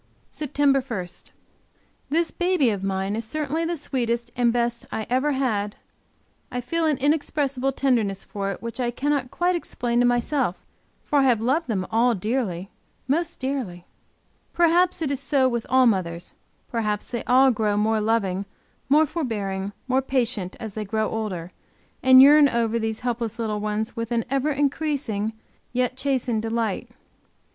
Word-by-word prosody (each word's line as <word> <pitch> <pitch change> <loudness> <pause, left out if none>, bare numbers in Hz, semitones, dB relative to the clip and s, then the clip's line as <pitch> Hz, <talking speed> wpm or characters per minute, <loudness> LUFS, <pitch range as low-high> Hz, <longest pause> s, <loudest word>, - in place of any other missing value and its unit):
SEPTEMBER 280 -2 +1
1. 225 -9 -4 1.0
This 330 +2 +1
baby 350 -9 +2
of 200 -2 -4
mine, 195 +1 -1
is 225 - -3
certainly 305 +6 -2
the 340 0 -2
sweetest 240 -4 -2
and 240 -1 +3
best 235 0 -1
I 220 - -3
ever 275 +4 +2
had 215 -6 -1 0.8
I 250 - -2
feel 320 +7 0
an 300 -3 +1
inexpressible 280 -2 0
tenderness 230 -8 0
for 195 -1 -4
it, 195 - -8
which 230 +2 -5
I 245 -1 +1
cannot 275 +1 -1
quite 355 +5 +1
explain 240 -7 -1
to 245 - +4
myself, 245 - 0 0.4
for 290 - +2
I 270 - +4
have 245 -4 +4
loved 270 +9 0
them 195 -6 -1
all 235 +2 +3
dearly, 200 -3 -2 0.4
most 335 +5 -1
dearly. 255 -10 -3 0.7
Perhaps 345 +1 +3
it 285 - -1
is 275 - -1
so 275 -1 +2
with 235 -2 -2
all 260 0 +5
mothers, 175 -6 0 0.3
perhaps 210 -3 -2
they 235 - -3
all 260 +2 +5
grow 210 -3 0
more 215 +1 +2
loving, 200 -3 0 0.4
more 305 +3 +5
forbearing, 205 - -3 0.2
more 260 +1 +2
patient 240 -8 -1
as 220 -3 -6
they 215 - -3
grow 215 +1 -1
older, 185 -6 -4 0.5
and 260 0 +8
yearn 290 0 +7
over 235 -1 0
these 220 -1 -2
helpless 235 -2 -2
little 215 -2 -2
ones 215 +1 -2
with 230 0 -4
an 230 -2 0
ever 275 +2 +1
increasing, 280 -7 -1 0.4
yet 250 0 0
chastened 260 -5 0
delight. 225 0 -2
240 Hz, 160 wpm, -24 LUFS, 215-275 Hz, 1.0 s, and